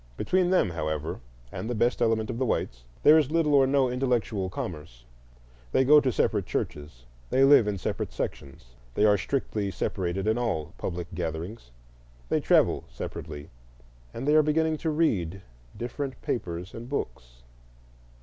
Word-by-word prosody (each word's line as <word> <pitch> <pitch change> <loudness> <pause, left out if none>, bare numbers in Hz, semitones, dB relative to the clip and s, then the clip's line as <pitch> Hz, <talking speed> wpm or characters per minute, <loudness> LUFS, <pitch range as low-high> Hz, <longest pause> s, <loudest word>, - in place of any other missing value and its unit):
Between 185 -1 +1
them, 180 - +3
however, 80 -1 -3 0.3
and 110 - -5
the 120 - -1
best 120 +3 +1
element 115 -1 +1
of 115 - -5
the 130 - +1
whites, - - -2 0.2
there 155 +2 +8
is 145 -4 0
little 160 -2 +2
or 135 -2 +5
no 135 -1 +3
intellectual 120 -6 -1
commerce. 75 -10 -7 0.7
They 130 - +3
go 150 +2 +7
to 130 - +1
separate - - 0
churches, 75 -5 -4 0.2
they 135 - +3
live 135 -5 +7
in 105 -1 -1
separate 90 - -3
sections, 70 -3 -6 0.3
they 105 - +3
are 105 -1 +6
strictly 105 -1 -2
separated 95 -1 -2
in 110 +2 +1
all 80 -11 -2
public 85 -1 -3
gatherings, 85 - -5 0.6
they - - +2
travel - - +3
separately, 75 0 -7 0.6
and 125 +4 -6
they 150 - +4
are 155 - +7
beginning 155 +1 +1
to 160 - -2
read 100 - 0 0.3
different 130 +3 -5
papers 90 -4 -4
and 120 +2 -8
books. - - -5
110 Hz, 160 wpm, -27 LUFS, 85-135 Hz, 0.7 s, there